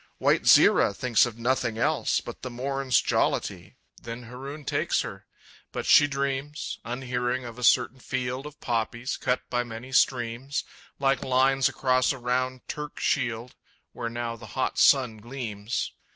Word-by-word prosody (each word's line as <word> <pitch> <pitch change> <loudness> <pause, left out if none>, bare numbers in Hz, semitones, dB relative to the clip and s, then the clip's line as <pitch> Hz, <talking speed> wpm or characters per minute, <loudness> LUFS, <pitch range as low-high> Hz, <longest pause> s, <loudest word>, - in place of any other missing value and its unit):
White - - +2
Zira 100 - +6
thinks 125 0 +3
of 115 -2 -8
nothing 115 -2 0
else 115 - +1
But - - -9
the 130 - -5
morn's 130 +1 0
jollity - - -1 0.3
"Then 115 +1 -7
Haroun 135 +5 -8
takes - - +1
her!" - - -8 0.4
But - - -4
she 145 - +7
dreams, 140 +2 -3
Unhearing, 125 0 -2
of 120 +1 -8
a - - -6
certain 125 +1 +3
field 130 +2 -3
Of 150 - -13
poppies, 120 +2 -2
cut 125 - -1
by 120 0 +1
many 120 +2 -9
streams, 125 +1 +1 0.3
Like 135 -1 +1
lines 135 +1 +3
across 130 -1 +2
a - - -7
round 130 +1 -2
Turk 150 -1 -6
shield, 120 -3 -1 0.4
Where 115 - -4
now 120 0 -4
the 115 -1 -11
hot 130 - 0
sun 125 -6 +5
gleams. 115 -2 -4
125 Hz, 150 wpm, -26 LUFS, 120-135 Hz, 0.4 s, she